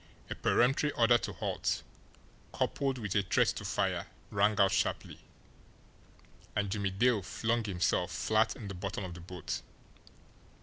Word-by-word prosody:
A - - +1
peremptory 135 +4 +2
order 120 0 +5
to - - -4
halt, - - -2 0.7
coupled 135 -2 0
with 105 -6 -3
a 100 - +4
threat 95 - +2
to - - -3
fire, - - -1 0.2
rang 105 +1 +2
out 95 -1 +5
sharply - - -1 1.4
and 100 -2 0
Jimmie 100 -1 0
Dale 110 +3 +2
flung 115 +5 -1
himself 90 -2 +1
flat 110 +5 +1
in 110 -6 -8
the 100 - -5
bottom 100 +3 -4
of 90 -2 -5
the 85 - -9
boat. 90 -1 -5
105 Hz, 145 wpm, -32 LUFS, 95-115 Hz, 1.4 s, order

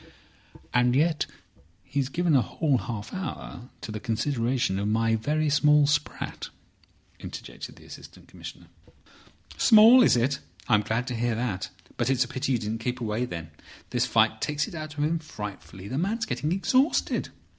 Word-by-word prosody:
"And 125 0 +3
yet 155 +2 +2 0.6
he's 135 -1 -2
given 170 +1 +1
a 130 - +6
whole 145 0 0
half 105 +1 -6
hour 160 -8 -6
to 110 - -6
the 105 - -4
consideration 120 -3 0
of 100 - -1
my 115 +1 +2
very 150 +7 0
small 150 0 +5
sprat," 145 +1 -2 0.7
interjected - - -8
the - - -17
Assistant - - -12
Commissioner. - - -10 0.9
"Small! 230 +3 +8
Is 180 - +5
it? 135 +4 +1 0.3
I'm 105 -3 +4
glad 115 +3 -1
to 125 - -3
hear 115 0 0
that. 100 -6 -2 0.3
But 120 +1 0
it's 130 -1 +3
a - - -7
pity 130 +2 -2
you - - +3
didn't 110 0 -3
keep 125 +2 -3
away, 115 +1 -1
then. 85 -8 -7 0.4
This - - +1
fight - - +2
takes 150 0 -1
it - - -10
out 155 -2 -7
of 145 - 0
him 160 +2 +1
frightfully. 105 - -8
The 130 +6 -2
man's 220 +6 -1
getting 150 -6 -2
exhausted. 255 - +1
130 Hz, 165 wpm, -27 LUFS, 115-150 Hz, 0.9 s, Small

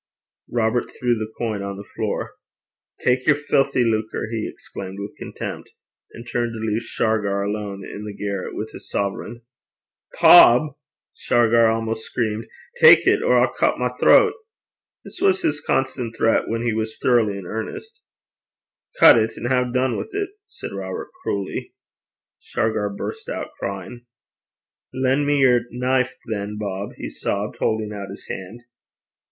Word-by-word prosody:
Robert 120 0 +1
threw 120 -1 +2
the 110 -1 -5
coin 110 -4 -2
on 100 0 -5
the 100 - -8
floor. - - -2 0.7
'Tak 125 +1 +2
yer 155 - +6
filthy 140 -3 +1
lucre!' 110 -1 -1
he 110 -2 -2
exclaimed 95 0 -9
with 100 +1 -7
contempt, - - -6 0.4
and 115 +1 -11
turned 120 0 -1
to 110 - -6
leave 110 0 -1
Shargar 105 -4 0
alone 100 -1 -4
in 105 - -8
the 105 - -5
garret 100 -2 -4
with 110 +1 -5
his - - -12
sovereign. 105 +4 -3 0.8
'Bob!' 135 +5 +7 0.4
Shargar 115 -1 +3
almost 110 0 -1
screamed, 110 -2 -2 0.3
'tak 480 0 +8
it, - - +4
or - - +3
I'll - - +3
cut - - +1
my - - 0
throat.' 455 -4 +5 0.7
This - - -11
was 385 -1 +3
his 145 0 0
constant 125 -3 -1
threat 115 - +2
when 115 +1 -2
he 120 -2 0
was 110 0 -3
thoroughly 115 -5 +2
in 95 - -8
earnest. 440 - -6 1.0
'Cut - - +9
it, 110 0 -1
an' 120 - -3
hae 125 -1 +1
dune 130 0 +1
wi' - - -3
't,' 400 0 -3
said 390 - -8
Robert 95 -1 -5
cruelly. 100 -1 -4 0.6
Shargar 110 -2 -1
burst 100 - -6
out - - -4
crying. 100 +5 -6 0.9
'Len' 130 +2 +1
me 145 0 +2
yer 125 -2 +4
knife, 130 +1 0
than, 105 -1 -4
Bob,' 100 -1 -4
he - - -5
sobbed, 100 +1 -3
holding 110 -1 -1
out 100 -1 -6
his 100 - -10
hand. 95 +6 -7
115 Hz, 155 wpm, -22 LUFS, 105-125 Hz, 1.0 s, Cut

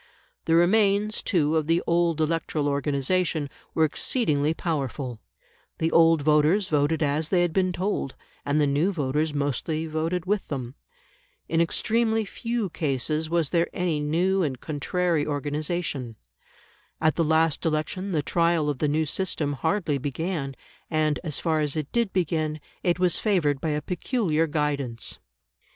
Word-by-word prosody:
The 165 - +3
remains, 205 +4 +3
too, 155 -4 +1
of 155 -2 +1
the 165 +1 +2
old 170 -1 +2
electoral 155 -2 0
organisation 145 +2 0 0.2
were 160 - +4
exceedingly 150 - +1
powerful; 140 -7 -3 0.6
the 160 0 0
old 165 -2 +5
voters 155 +6 +3
voted 150 +2 +2
as 150 +2 0
they 180 -2 +3
had 175 -2 -1
been 185 0 +2
told, 180 -6 -2 0.3
and 145 +2 +1
the 150 - +4
new 145 +7 +2
voters 150 -1 0
mostly 145 +3 -1
voted 165 +3 -2
with 205 +1 0
them. 130 -4 -4 0.7
In 165 0 +2
extremely 225 +5 +1
few 230 -2 -3
cases 155 +2 -1
was 165 -4 +1
there 170 0 +2
any 175 -4 0
new 175 +6 +1
and 135 -7 -1
contrary 165 +2 -1
organisation. 145 -3 -2 0.8
At 155 -1 +3
the 165 - +2
last 160 0 +2
election, 165 +5 -1
the 155 -4 0
trial 165 -3 +2
of 135 - -7
the 150 - +1
new 155 +2 +1
system 155 -3 -1
hardly 150 - 0
began, 145 0 -3 0.3
and, 155 -2 +1
as 155 -5 -2
far 160 -2 0
as 150 -2 -1
it 155 -3 -3
did 235 -4 +1
begin, 155 -4 -1 0.2
it 175 -2 +1
was 180 -1 +2
favoured 160 -10 +1
by 160 - -1
a 150 0 -1
peculiar 175 - 0
guidance. 145 -6 -2
160 Hz, 150 wpm, -25 LUFS, 145-175 Hz, 0.8 s, old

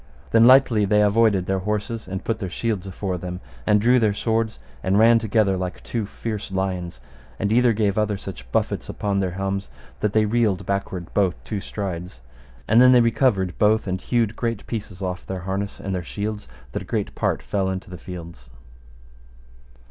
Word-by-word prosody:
Then 115 +1 +6
lightly 130 -5 +6
they 105 +1 +4
avoided 105 -3 +3
their 95 0 0
horses 105 +3 -3
and 95 +1 -5
put 115 -1 -2
their 95 - -3
shields 100 -1 -2
afore 95 -1 -3
them, 90 +1 -5 0.3
and 105 -1 +5
drew 125 +4 +4
their 105 -3 +2
swords 115 0 0 0.2
and 95 +5 +1
ran 115 +2 +6
together 110 -3 +2
like 90 -1 -5
two 115 -4 -3
fierce 105 -2 -5
lions, 90 -7 -3 0.4
and 105 +1 0
either 125 0 +5
gave 105 -2 +1
other 105 -1 0
such 70 -12 -9
buffets - - -1
upon 100 -1 -1
their 95 -1 0
helms 95 -2 -2 0.3
that 105 -1 0
they 110 0 +4
reeled 105 -3 +1
backward 95 -3 -3
both 95 -4 +2
two 105 - -3
strides; 90 - -5 0.5
and 115 +3 +6
then 125 0 +8
they 125 - +7
recovered 110 -6 +2
both, 110 +1 +3
and 95 -1 -2
hewed 115 -3 0
great 115 -3 -3
pieces 105 -4 -5
off 90 -1 -3
their 95 -1 -4
harness 95 +2 -3
and 95 - -4
their 90 - -1
shields 105 +5 -4 0.2
that - - -3
a - - -9
great - - -2
part - - -1
fell 95 -2 -1
into 95 0 -5
the 90 - -7
fields. 85 -10 -9
100 Hz, 185 wpm, -23 LUFS, 95-110 Hz, 0.5 s, then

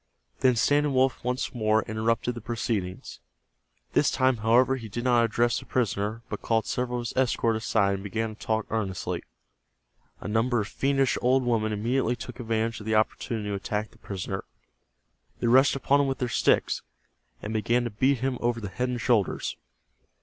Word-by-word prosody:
Then 125 -1 +4
Standing 145 +4 +2
Wolf 130 0 +2
once 125 +1 -2
more 110 -2 +2
interrupted 115 +2 -1
the 120 - -8
proceedings. 105 -5 -3 0.7
This - - +4
time, 130 -1 +2
however, 120 +4 +3
he 115 -4 -7
did 120 +4 -4
not 120 -2 +4
address 115 +1 +1
the - - -12
prisoner, 110 -1 -1
but - - -5
called 110 -1 +1
several 125 -1 -2
of 120 - -4
his - - -5
escort 120 -3 +2
aside 110 -3 +1
and 95 0 -4
began 110 +2 -2
to 110 - -18
talk 110 -1 0
earnestly. 100 -5 -2 1.0
A - - -7
number 115 +3 +1
of 105 - -2
fiendish 135 +3 +1
old 130 +1 +3
women 110 -3 +1
immediately 120 +3 0
took 125 +1 -9
advantage 115 -1 -1
of 105 - -9
the 110 - +1
opportunity 110 0 0
to - - -2
attack 105 +2 -3
the - - -22
prisoner. 95 0 -5 1.0
They - - -2
rushed 130 +4 +5
upon 140 +1 +3
him 140 - +1
with 135 -1 -1
their 125 - -2
sticks, - - +2 0.6
and 105 - -4
began 120 +3 +1
to 120 - -3
beat 130 +4 +1
him 130 -1 -1
over 120 0 0
the 105 -3 -5
head 125 +6 -2
and 125 -1 -2
shoulders. 110 -3 +1
115 Hz, 185 wpm, -27 LUFS, 110-125 Hz, 1.0 s, rushed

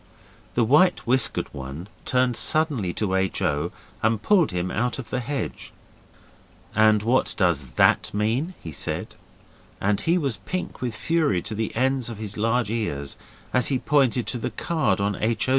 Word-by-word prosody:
The 120 - +3
white 150 +10 +4
whiskered 125 -1 +2
one 70 +6 -7 0.2
turned 125 -1 +2
suddenly 150 - +1
to 100 -4 -1
H. 95 0 0
O. 75 -4 0 0.3
and 110 0 +2
pulled 180 - +3
him 90 -1 -2
out 120 +2 -1
of 120 -5 -8
the 130 - 0
hedge. 140 +3 -4 1.0
'And 110 -1 +5
what 125 +4 +2
does 85 -7 +2
that - - +4
mean?' 115 - -1
he 80 - -6
said, - - -3 0.7
and 100 0 +1
he 170 +2 +2
was 140 -9 -1
pink 185 0 -5
with 120 -3 -2
fury 155 - +1
to - - -5
the 110 +1 -3
ends 130 0 +1
of 115 - -6
his 105 -1 -5
large 115 +1 +1
ears, 70 -12 -2 0.4
as 125 -1 +3
he 135 - +1
pointed 130 -3 +2
to 125 - -3
the - - -2
card 165 -9 0
on 100 0 0
H. 110 +2 0
O. - - 0
115 Hz, 175 wpm, -24 LUFS, 100-130 Hz, 1.0 s, And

